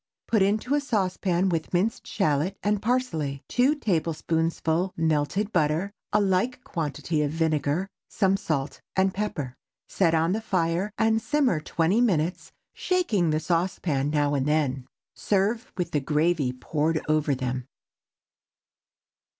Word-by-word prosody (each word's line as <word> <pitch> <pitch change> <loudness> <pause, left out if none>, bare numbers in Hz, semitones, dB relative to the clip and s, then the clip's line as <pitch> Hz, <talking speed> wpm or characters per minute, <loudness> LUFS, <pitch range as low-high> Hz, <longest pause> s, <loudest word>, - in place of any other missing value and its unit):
Put 220 -3 +2
into 215 +7 +1
a 290 - +3
saucepan 190 -6 0
with 165 -3 -1
a - - -23
minced 200 +6 0
shallot 170 0 0
and 205 0 +1
parsley, 165 - -1
two 260 +5 +3
tablespoonfuls 165 - 0
melted 165 +6 0
butter, 160 +4 +1 0.2
a 210 - +3
like 205 +6 +1
quantity 155 0 -2
of 150 - +1
vinegar, 160 +2 0 0.2
some 195 -1 +2
salt 145 -7 -3
and 190 0 +2
pepper. 155 -11 -3 0.3
Set 165 -4 +2
on 165 +2 +2
the 215 +3 -1
fire 185 -1 0
and 220 0 +2
simmer 275 - +1
twenty 170 +7 +1
minutes, 180 -7 0 0.2
shaking 235 - +1
the 155 0 +1
saucepan 165 -4 0
now 145 -1 +1
and 140 -1 0
then. 140 -4 0 0.3
Serve 210 +4 0
with 180 - -2
the 150 - +1
gravy 150 -1 +1
poured 155 +5 -1
over 150 -2 +2
them. 130 -1 -3
170 Hz, 135 wpm, -26 LUFS, 150-200 Hz, 0.3 s, a